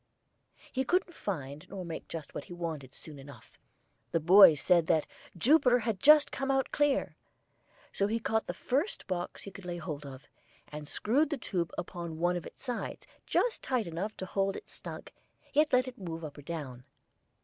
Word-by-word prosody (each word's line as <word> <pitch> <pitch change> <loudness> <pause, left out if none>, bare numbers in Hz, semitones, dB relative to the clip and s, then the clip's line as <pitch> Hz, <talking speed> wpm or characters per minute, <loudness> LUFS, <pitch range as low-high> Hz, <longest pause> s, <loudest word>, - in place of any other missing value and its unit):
He 265 - +1
couldn't 360 +5 +1
find 145 - -5
nor 190 -2 -6
make 165 -1 -6
just 160 -4 -7
what - - -5
he - - -9
wanted 160 -6 -5
soon 150 -3 -9
enough 140 +1 -14 0.5
the 165 - +1
boys 170 -2 +8
said 170 -1 +4
that 155 - +3 0.3
"Jupiter 250 - +5
had 225 -4 -2
just 300 +5 +7
come 270 0 -3
out 270 -1 +1
clear" 290 -2 +3
and - - -23 0.8
so 200 - +1
he 225 +2 0
caught 220 0 0
the 175 - -2
first 275 - -1
box 180 -2 -4
he 200 - -8
could 195 - -11
lay 175 -1 -4
hold 155 -3 -5
of, 135 -1 -10 0.4
and 150 0 -7
screwed 275 - +1
the 295 - -1
tube 175 -8 -2
upon 170 -2 -5
one 175 +2 +2
of 175 - -4
its - - -15
sides, 245 -3 -4 0.2
just - - +1
tight 255 -5 0
enough 175 +6 -4
to 185 - -4
hold 195 +1 0
it - - -8
snug, - - -9 0.4
yet 300 +1 +4
let 255 0 +4
it 255 - -8
move 165 -3 -5
up 150 -2 -6
or - - -8
down. 140 -5 -6
185 Hz, 195 wpm, -31 LUFS, 160-250 Hz, 0.8 s, boys